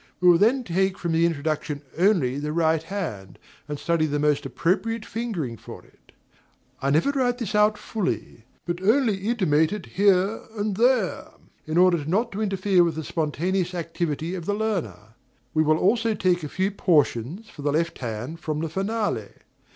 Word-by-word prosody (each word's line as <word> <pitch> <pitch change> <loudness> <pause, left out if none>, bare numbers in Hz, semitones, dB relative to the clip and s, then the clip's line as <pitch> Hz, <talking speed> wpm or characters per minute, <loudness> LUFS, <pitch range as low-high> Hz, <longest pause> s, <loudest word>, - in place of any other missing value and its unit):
We 180 - +3
will 170 -1 +6
then 245 +6 +3
take 190 0 0
from 170 - -3
the 165 +1 +3
introduction 150 -2 -2
only 165 -8 +2
the 150 +1 -3
right 160 -1 +2
hand, 160 - -5 0.3
and 150 -1 -4
study 165 +1 +1
the 145 0 -1
most 145 -1 +1
appropriate 200 - -1
fingering 185 - -4
for - - -11
it. - - -26 0.7
I 135 - 0
never 155 - +3
write 250 -3 0
this 230 -3 -4
out 210 0 +4
fully; 185 - -4 0.2
but 175 +1 -3
only 220 +1 +3
intimate 160 -9 +2
it 210 -3 -5
here 195 +2 +2 0.2
and 205 -1 -1
there, 235 -2 +2 0.4
in 155 +1 -1
order 180 -3 +4
not 205 +10 0
to 205 - -4
interfere 195 -3 +2
with 165 -2 0
the 160 - -4
spontaneous 175 +4 -1
activity 165 -1 -3
of 175 -3 -6
the 205 - +1
learner. 135 - -3 0.4
We 155 - +3
will 155 0 +3
also 225 +4 +2
take 180 -2 +1
a 150 - -4
few 190 +5 -1
portions 165 - +1
for 145 - -11
the 145 0 0
left 165 +3 -1
hand 120 +6 -5
from 155 -2 -3
the 165 - -2
finale. 195 - -2
175 Hz, 175 wpm, -24 LUFS, 155-205 Hz, 0.7 s, will